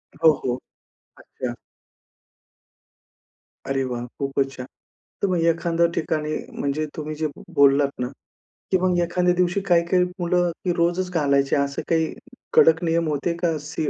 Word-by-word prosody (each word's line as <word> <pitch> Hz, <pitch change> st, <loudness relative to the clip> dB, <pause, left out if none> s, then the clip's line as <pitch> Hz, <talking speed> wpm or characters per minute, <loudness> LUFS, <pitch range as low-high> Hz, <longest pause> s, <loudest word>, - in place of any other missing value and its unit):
हो, 160 Hz, -, +6 dB
हो, 125 Hz, -1 st, 0 dB, 0.6 s
अच्छा. 125 Hz, -2 st, -6 dB, 2.1 s
अरे 135 Hz, 0 st, 0 dB
वाह! 120 Hz, -2 st, -3 dB
खूपचं 135 Hz, 0 st, 0 dB
छान. 125 Hz, -, -6 dB, 0.6 s
तर -, -, +4 dB
मग 180 Hz, -2 st, +1 dB
एखाद्या 170 Hz, 0 st, +1 dB
ठिकाणी 155 Hz, -1 st, -1 dB, 0.2 s
म्हणजे 140 Hz, +2 st, -1 dB
तुम्ही 155 Hz, 0 st, -5 dB
जे 155 Hz, +1 st, -1 dB, 0.3 s
बोललात 140 Hz, 0 st, +5 dB
ना, 125 Hz, -, -1 dB, 0.6 s
की 190 Hz, -, +5 dB
मग 180 Hz, -1 st, +2 dB
एखाद्या 180 Hz, +1 st, +1 dB
दिवशी 180 Hz, +2 st, +1 dB
काही-काही 175 Hz, +1 st, +4 dB, 0.2 s
मुलं 175 Hz, 0 st, +1 dB, 0.2 s
रोजच 175 Hz, +2 st, 0 dB
घालायची. 140 Hz, -4 st, +2 dB
असं 140 Hz, -1 st, 0 dB
काही 160 Hz, -1 st, +1 dB, 0.4 s
कडक 160 Hz, +1 st, +5 dB
नियम 165 Hz, 0 st, +1 dB
होते 150 Hz, +3 st, -1 dB
का, 170 Hz, -2 st, 0 dB
स 150 Hz, +1 st, -9 dB
160 Hz, 135 wpm, -23 LUFS, 140-175 Hz, 2.1 s, हो